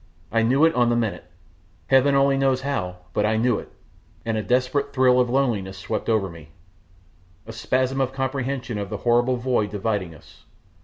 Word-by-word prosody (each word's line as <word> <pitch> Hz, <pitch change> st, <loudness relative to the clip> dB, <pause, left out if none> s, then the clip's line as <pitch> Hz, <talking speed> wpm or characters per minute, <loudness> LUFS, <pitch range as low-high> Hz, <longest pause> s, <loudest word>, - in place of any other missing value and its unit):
I 115 Hz, -, +2 dB
knew 130 Hz, +7 st, +4 dB
it 165 Hz, -, +3 dB
on 120 Hz, -1 st, +2 dB
the 120 Hz, -, +2 dB
minute, 115 Hz, -6 st, -2 dB, 0.6 s
Heaven 135 Hz, +1 st, +4 dB
only 140 Hz, 0 st, +3 dB
knows 135 Hz, -1 st, +1 dB
how, 90 Hz, -11 st, -3 dB, 0.2 s
but 105 Hz, -, +1 dB
I 110 Hz, +1 st, +1 dB
knew 120 Hz, +3 st, +1 dB
it, -, -, -12 dB, 0.5 s
and 115 Hz, -1 st, -1 dB
a 110 Hz, -, 0 dB
desperate 130 Hz, +5 st, 0 dB
thrill 130 Hz, -1 st, +4 dB
of 125 Hz, -1 st, +2 dB
loneliness 115 Hz, -8 st, 0 dB
swept 95 Hz, -, -4 dB
over 110 Hz, -4 st, +2 dB
me, 85 Hz, -4 st, -12 dB, 1.0 s
a 115 Hz, -, -9 dB
spasm 130 Hz, +3 st, 0 dB
of 130 Hz, -1 st, 0 dB
comprehension 130 Hz, -3 st, -3 dB
of 100 Hz, -2 st, -5 dB
the 105 Hz, -, -4 dB
horrible 120 Hz, +1 st, +3 dB
void 120 Hz, -4 st, 0 dB
dividing 100 Hz, -4 st, -3 dB
us. 80 Hz, 0 st, -19 dB
120 Hz, 185 wpm, -23 LUFS, 105-135 Hz, 1.0 s, knew